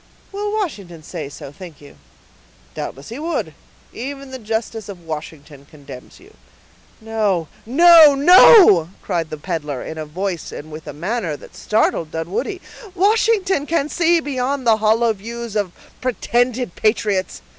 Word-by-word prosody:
"Will 410 +1 -3
Washington 200 - -4
say 155 -3 -7
so, 140 -1 -10
think 165 0 -12
you?" 145 - -15 0.8
"Doubtless 135 +2 -7
he 235 +5 -7
would; 330 +2 -3 0.4
even 275 +2 -7
the 260 - -7
justice 220 -1 -4
of 175 -4 -10
Washington 150 -2 -8
condemns 140 -4 -13
you." - - -19 0.7
"No, 215 -7 -1 0.2
no, 320 +2 +7
no," 290 - +7
cried 170 -4 -2
the 155 - -6
peddler, 150 -4 -4
in 160 - -7
a 155 - -4
voice 180 +1 -4
and 155 +2 -9
with 155 +1 -10
a - - -5
manner 175 - -3
that - - -15
startled 210 -7 0
Dunwoodie. 175 - -4 0.3
"Washington 395 -5 +2
can 305 -3 0
see 340 0 +2
beyond 270 -2 -3
the 225 -2 +4
hollow 220 +2 +2
views 230 +2 -8
of 205 -4 -1 0.3
pretended 245 -3 -1
patriots. 210 -3 -1
220 Hz, 145 wpm, -19 LUFS, -, 0.8 s, no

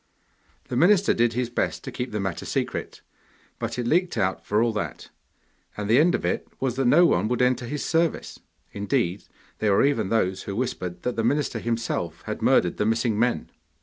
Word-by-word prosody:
The - - -3
minister 190 +8 +4
did 115 0 +2
his 120 0 -2
best - - -2
to - - -6
keep 125 0 -4
the 105 - -2
matter 95 -3 -3
secret, - - -3 0.6
but - - -3
it 120 - -2
leaked 175 +8 +1
out 95 -1 0
for 105 +2 +1
all 115 -1 +1
that, 105 - -5 0.7
and 105 -1 -3
the 115 +5 +5
end 170 +3 +4
of - - -3
it - - -1
was 130 -2 -1
that 135 - +1
no 175 +8 +6
one 90 - +2
would 125 +1 -1
enter 125 -1 +1
his 145 +3 -3
service. 165 0 0 0.3
Indeed, 100 -2 -1 0.3
there 105 -2 +2
were 100 - +4
even 115 -9 +1
those 95 -4 +1
who 100 - -5
whispered 90 -7 -3
that 125 -1 -2
the 115 - +1
minister 145 +5 0
himself 115 -8 -3
had - - -5
murdered - - +3
the 105 - 0
missing 115 -1 +1
men! 120 +1 0
115 Hz, 200 wpm, -25 LUFS, 105-130 Hz, 0.7 s, no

